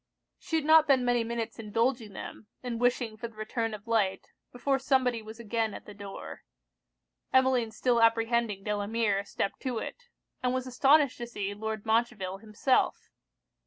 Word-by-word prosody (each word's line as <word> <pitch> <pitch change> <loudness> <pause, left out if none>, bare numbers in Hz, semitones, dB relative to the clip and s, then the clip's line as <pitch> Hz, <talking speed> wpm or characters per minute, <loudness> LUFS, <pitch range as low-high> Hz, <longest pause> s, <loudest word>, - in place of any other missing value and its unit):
She 325 - -4
had 315 -2 +1
not 315 0 +7
been 265 -3 +4
many 245 -1 +2
minutes 230 -1 -4
indulging 225 0 -1
them, 210 - -8 0.2
and 240 -2 -4
wishing 245 -3 +1
for 235 +2 -5
the 225 - -18
return 220 +1 -2
of 205 +1 -13
light, 210 -5 0 0.2
before 270 +2 0
somebody 260 -3 +2
was 220 +1 -10
again 225 -1 -1
at - - -10
the 210 - -10
door. 195 - -9 0.9
Emmeline 260 -3 +3
still 235 +1 +1
apprehending 230 -2 +2
Delamere, 210 0 0
stepped 200 - -3
to 255 -3 -3
it; 485 - -6 0.3
and 250 0 +1
was 255 0 -2
astonished 270 +2 +4
to 240 - -4
see 205 -4 -4
Lord 220 0 -4
Montreville 220 -4 0
himself. 220 +5 0
230 Hz, 160 wpm, -29 LUFS, 215-250 Hz, 0.9 s, not